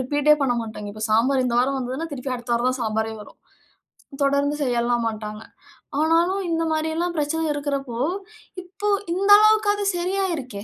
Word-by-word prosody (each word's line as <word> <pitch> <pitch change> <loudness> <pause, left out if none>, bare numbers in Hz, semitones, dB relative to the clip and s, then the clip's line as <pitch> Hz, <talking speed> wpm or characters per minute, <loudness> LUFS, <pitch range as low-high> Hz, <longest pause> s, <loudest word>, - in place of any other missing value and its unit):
Repeat 290 +3 +1
எ - - -6
பண்ணமாட்டாங்க. 230 -5 -2
இப்ப 215 - -7
சாம்பாரு 255 +4 +3
இந்த 240 - -1
வாரம் 270 +2 0
வந்ததுன்னா, 260 +5 -4
திருப்பி 260 -1 -4
அடுத்த 240 0 -2
வாரம் 240 +2 +1
தான் 255 - -4
சாம்பாரே 220 0 -1
வரும். - - -16 0.9
தொடர்ந்து 280 +1 +1
செய்யலாம் 240 -1 0
மாட்டாங்க. 215 -1 -6 0.6
ஆனாலும். 340 +5 +2
இந்த 330 0 0
மாரியெல்லாம் 320 +3 -1
பிரச்சனை 300 +2 -1
இருக்கிறப்போ 280 -4 -3 0.7
இப்ப 405 +3 -2 0.2
இந்த 395 +2 0
அளவுக்காவது 425 -1 +3
சரியாகிருக்கே. 345 - -2
275 Hz, 145 wpm, -23 LUFS, 240-330 Hz, 0.9 s, சாம்பாரு